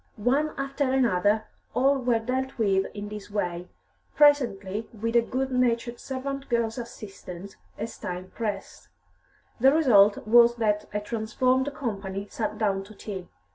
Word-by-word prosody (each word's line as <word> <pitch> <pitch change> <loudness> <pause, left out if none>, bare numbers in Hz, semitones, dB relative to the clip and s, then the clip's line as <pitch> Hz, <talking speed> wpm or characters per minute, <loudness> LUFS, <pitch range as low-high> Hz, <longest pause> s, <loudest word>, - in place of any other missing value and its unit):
One 275 +8 +1
after 275 0 -1
another, 215 -4 +2 0.3
all 275 +1 +3
were 240 -2 +2
dealt 260 +4 -3
with 195 -4 +2
in 205 0 -5
this 210 -1 -8
way, 180 -4 -3 0.5
presently 225 -8 +3
with 230 +1 -3
a 235 - +7
good 260 +3 -2
natured 240 -1 0
servant 275 +1 -5
girl's 235 -1 0
assistance, 200 -5 -9 0.2
as 220 +2 -6
time 180 +1 -6
pressed. 210 -4 -5 0.7
The 265 +3 +6
result 220 -10 +5
was 235 +1 +6
that 210 -2 0
a 210 0 -2
transformed 255 +5 0
company 200 -6 -4
sat 220 - -3
down 195 -3 0
to 215 +1 -14
tea. 190 -4 -7
230 Hz, 140 wpm, -26 LUFS, 205-255 Hz, 0.7 s, a